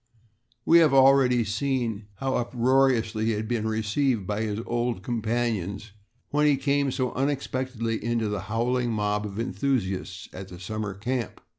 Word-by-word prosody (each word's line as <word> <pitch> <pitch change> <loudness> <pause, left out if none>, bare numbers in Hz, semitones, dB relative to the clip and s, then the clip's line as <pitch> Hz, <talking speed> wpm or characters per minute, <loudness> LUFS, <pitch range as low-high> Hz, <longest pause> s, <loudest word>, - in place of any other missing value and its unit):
We 170 - +7
have 155 -4 +4
already 130 -2 +5
seen 115 -1 -2
how 135 +5 -2
uproariously 120 -2 +2
he 115 - +2
had 110 +1 -3
been 115 -2 -1
received 110 +1 0
by 105 +2 -2
his 105 -1 -2
old 120 -4 -1
companions 110 -3 -2 0.4
when 150 +1 +3
he 145 -2 +4
came 140 0 +1
so 130 -1 -1
unexpectedly 130 -4 -2
into 115 -1 0
the 105 -2 -2
howling 120 +2 0
mob 105 0 -1
of 100 0 -8
enthusiasts 95 -5 -2
at 95 0 -7
the 90 -2 -11
summer 105 +1 -4
camp. 120 +2 -3
115 Hz, 150 wpm, -26 LUFS, 105-130 Hz, 0.4 s, We